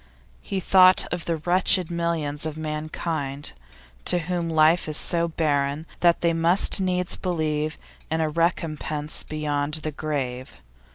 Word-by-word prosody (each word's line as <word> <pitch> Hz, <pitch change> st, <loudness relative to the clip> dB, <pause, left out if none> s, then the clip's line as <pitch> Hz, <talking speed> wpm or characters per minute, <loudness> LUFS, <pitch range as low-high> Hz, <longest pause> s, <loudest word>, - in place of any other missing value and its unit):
He 195 Hz, -, -3 dB
thought 185 Hz, 0 st, +5 dB
of 175 Hz, -1 st, -4 dB
the 165 Hz, -1 st, -1 dB
wretched 180 Hz, +1 st, +3 dB
millions 165 Hz, -4 st, -2 dB
of 155 Hz, 0 st, -6 dB
mankind 155 Hz, -2 st, -4 dB, 0.5 s
to -, -, +4 dB
whom 175 Hz, 0 st, -2 dB
life 160 Hz, +1 st, +3 dB
is 155 Hz, -, +2 dB
so 170 Hz, -1 st, +3 dB
barren 145 Hz, -2 st, -1 dB
that 170 Hz, -1 st, +3 dB
they 170 Hz, -1 st, +2 dB
must 170 Hz, +4 st, +3 dB
needs 180 Hz, -1 st, 0 dB
believe 155 Hz, -4 st, -2 dB, 0.3 s
in 160 Hz, 0 st, -1 dB
a 160 Hz, -, +1 dB
recompense 155 Hz, -2 st, -2 dB
beyond 150 Hz, -1 st, -2 dB
the 155 Hz, -1 st, -2 dB
grave. 130 Hz, -, -4 dB
160 Hz, 135 wpm, -24 LUFS, 150-170 Hz, 0.5 s, thought